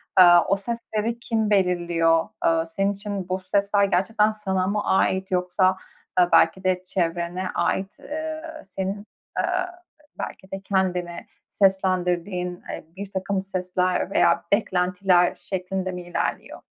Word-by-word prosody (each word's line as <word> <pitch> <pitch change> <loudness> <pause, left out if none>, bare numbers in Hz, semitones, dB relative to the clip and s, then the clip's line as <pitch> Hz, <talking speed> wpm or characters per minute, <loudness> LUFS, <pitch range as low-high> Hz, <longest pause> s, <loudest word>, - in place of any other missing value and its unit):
aaa, 175 -2 +8
o 195 - +2
sesleri 230 +1 -3
kim 225 -2 -1
belirliyor? 175 -4 +2
Aaa, 165 0 +2
senin 195 +5 -1
için 200 -2 -5
bu 185 +1 -1
sesler 200 +1 +2
gerçekten 210 +3 +2
sana 190 -3 -1
mı 205 +1 0
ait 190 0 +1
yoksa, 185 +1 +2 0.4
aaa, 180 -1 +4
belki 190 - +4
de 185 -1 +1
çevrene 175 +1 -2
ait, 190 +1 -1
eee, 315 +1 -5 0.2
senin, 195 +2 -4 0.3
eee, - - +2 0.8
belki 190 - -7
de 195 0 -5
kendine 180 -3 -1 0.2
seslendirdiğin, 180 -2 0
eee, - - -6
birtakım 195 0 -2
sesler 185 -1 -1
veya 170 - +3
beklentiler 180 -2 +2
şeklinde 185 0 -2
mi 180 0 -6
ilerliyor? 175 0 -3
190 Hz, 125 wpm, -24 LUFS, 180-200 Hz, 0.8 s, aaa